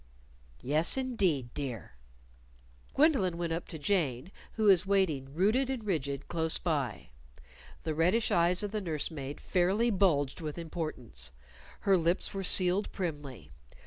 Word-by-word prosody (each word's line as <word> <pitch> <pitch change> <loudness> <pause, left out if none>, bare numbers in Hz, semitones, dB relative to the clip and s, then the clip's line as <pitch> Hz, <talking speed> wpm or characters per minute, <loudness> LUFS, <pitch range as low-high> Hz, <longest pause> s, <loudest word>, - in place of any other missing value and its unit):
"Yes, 155 - +2
indeed, 190 - 0
dear." 125 - -5 1.0
Gwendolyn 265 - +3
went 170 -1 -2
up 165 - -4
to 160 - -7
Jane, 150 -3 -1 0.2
who 220 - -2
was 190 -4 +6
waiting, 180 -9 0
rooted 220 +9 +2
and 260 -4 -3
rigid, 140 -8 -2
close 160 -1 0
by. 145 -9 -2 0.7
The 160 - -2
reddish 180 +9 +2
eyes 175 +3 +2
of 205 - -3
the 215 -1 -2
nurse 160 -5 -2
maid 140 -2 -6
fairly 195 +6 +1
bulged 170 -7 +1
with 155 -1 -5
importance. 155 - -4 0.5
Her 195 -1 +4
lips 170 +4 0
were 195 -1 -3
sealed 185 +2 +3
primly. 145 -8 -5
170 Hz, 140 wpm, -30 LUFS, 145-195 Hz, 1.0 s, was